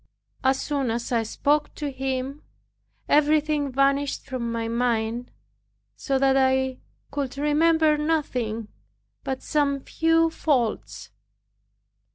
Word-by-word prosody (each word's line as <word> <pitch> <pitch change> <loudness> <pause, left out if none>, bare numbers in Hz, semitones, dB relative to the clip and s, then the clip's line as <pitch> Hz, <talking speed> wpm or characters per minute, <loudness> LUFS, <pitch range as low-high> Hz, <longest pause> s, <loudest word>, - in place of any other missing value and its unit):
As 265 0 +3
soon 280 -4 -1
as 235 +2 -3
I 235 -2 +2
spoke 290 +7 0
to 295 -2 -4
him, 265 +2 -3 0.7
everything 300 -1 +2
vanished 275 +2 +1
from 240 -3 -3
my 230 0 -2
mind, 235 0 -1 0.7
so 270 -2 -1
that 270 0 +3
I 265 -1 +2 0.3
could 275 -2 -3
remember 305 +1 +3
nothing 250 -9 -1 0.5
but 265 -1 -4
some 285 -2 +1
few 325 +3 +2
faults. 255 -9 -1
270 Hz, 110 wpm, -25 LUFS, 250-295 Hz, 0.7 s, As